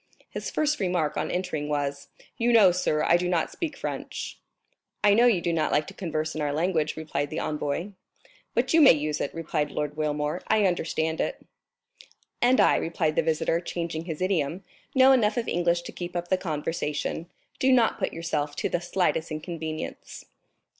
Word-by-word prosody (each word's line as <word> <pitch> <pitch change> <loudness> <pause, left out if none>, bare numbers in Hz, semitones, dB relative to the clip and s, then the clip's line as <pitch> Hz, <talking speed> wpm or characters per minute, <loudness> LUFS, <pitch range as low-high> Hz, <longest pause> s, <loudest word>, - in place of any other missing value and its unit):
His - - -4
first 300 0 0
remark 180 -6 0
on - - -2
entering 180 -5 -2
was: 140 -1 -2 0.3
"You 240 +1 +1
know, 215 -6 +7
sir, 155 -3 0
I 170 - +5
do 180 0 -1
not 170 -3 0
speak 330 -3 -4
French?" - - -5 0.6
"I 205 -1 +6
know 235 +4 +5
you 205 -8 +3
do 170 0 0
not 160 -2 0
like 150 - +2
to - - -10
converse 155 -4 -3
in 155 - -4
our 145 -1 0
language," 160 0 0
replied 145 -2 -2
the 155 - -5
envoy. 150 +5 -2 0.6
"But - - +1
you 325 - +6
may 280 - +9
use 150 -1 -2
it," - - -2
replied 150 -2 -2
Lord 150 -1 -3
Wilmore; 150 +1 -1
"I 215 -2 +3
understand 160 -3 0
it." - - -3 1.0
"And 250 +2 +4
I," - - +5
replied 160 -2 -1
the - - +4
visitor, 165 +1 +1
changing 170 -2 -4
his 165 0 -4
idiom, 180 -1 0 0.3
"know 265 0 +7
enough 225 -5 +3
of 235 - -1
English 170 0 +1
to - - -7
keep 175 0 -7
up 175 0 -3
the 185 - +4
conversation. 155 -1 -3 0.3
Do 265 - +3
not 240 -3 +3
put 190 - -1
yourself 150 -3 -2
to - - -1
the 175 - -1
slightest 175 -2 0
inconvenience." 155 0 -6
165 Hz, 185 wpm, -26 LUFS, 155-185 Hz, 1.0 s, may